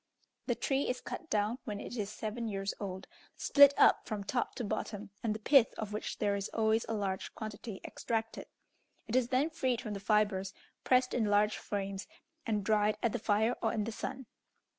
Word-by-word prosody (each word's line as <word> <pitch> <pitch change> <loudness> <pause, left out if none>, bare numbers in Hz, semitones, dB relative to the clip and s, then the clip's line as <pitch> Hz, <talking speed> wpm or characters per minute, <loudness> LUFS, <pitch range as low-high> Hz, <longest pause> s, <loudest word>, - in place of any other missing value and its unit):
The - - +1
tree 275 -1 0
is 250 0 -1
cut 330 - -7
down 215 +4 0
when 210 -4 -4
it 240 - -6
is 205 -4 -2
seven 220 +2 -4
years 195 -2 -2
old, 190 -2 -5 0.3
split 285 -1 +7
up - - +5
from 210 -3 -3
top 240 +5 -1
to 245 - -3
bottom, 205 -1 -4
and 215 -2 0
the - - -5
pith, 250 +2 +5
of 210 -1 -4
which 210 - -4
there 205 -1 +1
is 200 0 -3
always 220 0 +1
a 225 - 0
large 195 -2 -3
quantity, 215 -1 -6
extracted; 225 -1 -3 0.6
it 225 - -2
is 255 -2 +3
then 265 +6 +1
freed 260 -7 0
from 220 -4 -5
the 200 - -4
fibres, 200 -2 +1 0.3
pressed 255 0 +3
in 230 - +1
large 210 +1 +3
frames, 195 -1 -4 0.4
and 210 -3 0
dried 210 0 +2
at 235 - +3
the - - -2
fire 220 +3 +2
or - - +1
in 215 - 0
the 230 - -3
sun. 255 +4 -5
215 Hz, 200 wpm, -32 LUFS, 205-240 Hz, 0.6 s, split